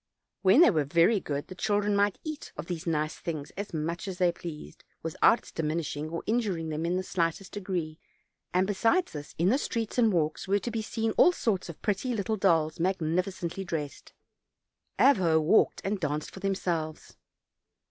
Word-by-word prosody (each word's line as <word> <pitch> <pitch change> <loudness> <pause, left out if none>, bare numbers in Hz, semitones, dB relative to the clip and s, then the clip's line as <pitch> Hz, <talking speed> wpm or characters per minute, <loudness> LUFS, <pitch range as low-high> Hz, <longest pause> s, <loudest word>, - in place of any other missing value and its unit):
When 195 - +6
they 345 - +7
were 155 -5 +1
very 170 +9 +3
good 145 -4 -4
the 185 - -8
children 205 +2 +1
might 200 0 +2
eat 310 -2 -6
of 150 - -5
these 170 -1 -5
nice 155 -1 -1
things 155 -4 -5
as 200 +1 -6
much 165 +3 -3
as 190 -2 -5
they 180 -2 +3
pleased, 170 -3 -9 0.2
without 165 +7 +4
its - - -15
diminishing 155 -1 -2
or 165 +1 -4
injuring 200 -8 -1
them 155 +2 -2
in 175 - 0
the 185 - -1
slightest 185 +1 -2
degree, 180 -6 -4 0.5
and 185 +1 +2
besides 225 - +1
this, 145 -1 -8
in 170 +3 +3
the 260 +6 +3
streets 230 -3 -2
and 225 -3 +5
walks 160 0 -1
were 200 +1 +3
to 235 +4 -4
be 225 -1 -2
seen 225 +1 -2
all 360 - +7
sorts 195 - -1
of 170 - -8
pretty 220 +4 0
little 215 +1 -1
dolls, 165 -6 +2
magnificently 180 +1 -1
dressed, 155 -6 -5 0.9
Avho 190 - +5
walked 160 +8 +3
and 200 +1 -1
danced 150 -2 -3
of 190 - -9
them 195 -1 0
selves. 160 -4 -3
180 Hz, 185 wpm, -28 LUFS, 160-205 Hz, 0.9 s, they